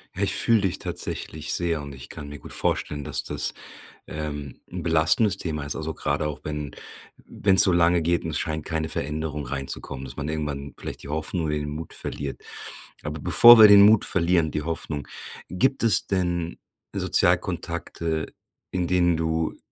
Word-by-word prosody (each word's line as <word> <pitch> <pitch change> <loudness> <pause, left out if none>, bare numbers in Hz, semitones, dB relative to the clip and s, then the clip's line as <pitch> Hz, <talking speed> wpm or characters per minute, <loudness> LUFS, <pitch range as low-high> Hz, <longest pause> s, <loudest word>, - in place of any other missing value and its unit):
Ja, - - -4
ich - - +2
fühle 115 -3 +3
dich 95 -3 -1
tatsächlich 80 0 -4
sehr 85 -3 -1
und 70 -1 -9
ich 65 - -11
kann 70 -2 -9
mir 75 - -8
gut - - -10
vorstellen, 75 -1 -1
dass - - -2
das, - - -3 0.5
ähm, 75 -3 -7
'n - - -6
belastendes 85 +5 +3
Thema 75 -5 -4
ist. 75 - -4
Also, 80 0 -5
grade 75 +1 -1
auch, 75 - -6
wenn 75 -2 -5 0.5
wenn 95 -1 +1
es - - +12
so 95 - +5
lange 85 -1 +3
geht 85 +1 0
und 80 - -4
es 75 - -2
scheint 80 -1 -3
keine 80 0 -3
Veränderung 75 -1 -4
reinzukommen, 65 0 -5
dass 65 - -9
man 70 +1 -5
irgendwann 75 -3 -5
vielleicht - - -8
die - - -11
Hoffnung 80 +3 -3
oder 75 -1 -1
den 75 0 -4
Mut 80 +2 -7
verliert. 70 -1 -6 0.6
Aber 75 +1 -6
bevor 115 +10 +8
wir 110 -1 +10
den 100 -1 +8
Mut 105 +1 +6
verlieren, 85 -3 +1
die 75 - -3
Hoffnung, 75 -2 -5 0.4
gibt 130 - 0
es 115 -6 +4
denn 90 -3 -2 0.4
Sozialkontakte, 80 -2 0 0.4
in 90 -1 -2
denen 85 -2 +2
du 80 0 -2
80 Hz, 180 wpm, -24 LUFS, 75-85 Hz, 0.6 s, es